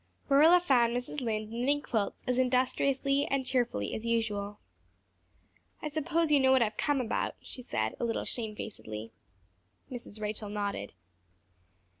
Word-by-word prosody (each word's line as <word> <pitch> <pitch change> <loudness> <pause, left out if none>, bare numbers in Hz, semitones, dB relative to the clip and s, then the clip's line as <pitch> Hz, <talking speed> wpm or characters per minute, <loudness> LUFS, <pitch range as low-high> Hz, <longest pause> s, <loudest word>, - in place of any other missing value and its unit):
Marilla 315 +6 +7
found 245 -8 +3
Mrs. 250 +3 -4
Lynde 215 -2 -2
knitting 255 +5 +1
quilts 215 -4 -2
as 250 0 +1
industriously 260 +2 +2
and 275 -1 0
cheerfully 240 - 0
as 220 - -4
usual. 210 -3 -1 1.2
"I 305 - -4
suppose 315 +1 0
you 290 - +6
know 265 -1 +4
what 260 -2 +5
I've 215 -1 -2
come 290 -2 +1
about," 245 -3 -1
she 255 - -8
said, 110 - -1
a - - -2
little 230 -1 -1
shamefacedly. 210 - -5 0.8
Mrs. 235 -4 -6
Rachel 210 0 -3
nodded. 200 - -3
240 Hz, 140 wpm, -30 LUFS, 215-275 Hz, 1.2 s, Marilla